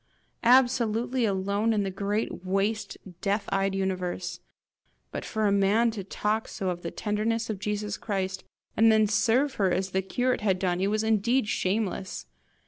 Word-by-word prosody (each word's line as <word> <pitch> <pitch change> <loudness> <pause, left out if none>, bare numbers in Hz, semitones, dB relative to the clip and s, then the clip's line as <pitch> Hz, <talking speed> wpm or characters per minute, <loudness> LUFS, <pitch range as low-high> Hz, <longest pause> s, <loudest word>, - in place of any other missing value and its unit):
absolutely 245 -1 +3
alone 200 +2 +1
in 210 -2 +1
the 195 - -2
great 200 +1 -2
waste, 200 +2 -1 0.2
death 200 +1 0
eyed 195 0 0
universe! 185 -2 -2 0.7
But - - -4
for 220 -1 -1
a 205 - +3
man 200 +4 +3
to 210 -3 -5
talk 210 +3 -1
so 190 -2 -3
of 175 0 -6
the - - -4
tenderness 220 +2 -1
of 205 - -5
Jesus 210 0 -2
Christ, 190 -3 -3 0.3
and 225 +1 +6
then 220 0 +5
serve 230 +6 +2
her 190 - +4
as 185 +1 -1
the 190 - +1
curate 245 +6 0
had 195 -3 +2
done 180 -1 0
it 195 - +2
was 215 +1 0
indeed 220 +2 +2
shameless! 195 -2 -2
210 Hz, 165 wpm, -27 LUFS, 195-225 Hz, 0.7 s, and